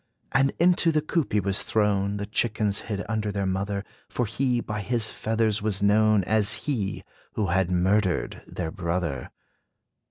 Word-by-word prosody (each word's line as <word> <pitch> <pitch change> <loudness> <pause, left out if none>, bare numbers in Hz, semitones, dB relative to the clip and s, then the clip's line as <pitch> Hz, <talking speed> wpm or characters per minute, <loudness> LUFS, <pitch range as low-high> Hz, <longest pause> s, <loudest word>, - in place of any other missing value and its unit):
And 135 0 +3
into 175 -1 +4
the 155 -1 +1
coop 155 -2 -1
he 105 - +3
was 100 0 0
thrown: 105 -2 +1
The 100 - -3
chickens 105 -1 0
hid 100 -1 -3
under 110 -1 -1
their 100 -1 -2
mother, 100 +1 -2 0.2
For 125 - -1
he, 125 +2 0
by 105 -2 -4
his 115 +1 0
feathers 110 -1 0
was 100 -2 -1
known 105 0 +4
As 105 +2 +3
he, 110 -10 -2 0.3
who 105 -4 -1
had 95 0 +1
murdered 95 +1 +1
their 80 -3 -4
brother. 85 -7 -3
105 Hz, 160 wpm, -26 LUFS, 95-110 Hz, 0.3 s, into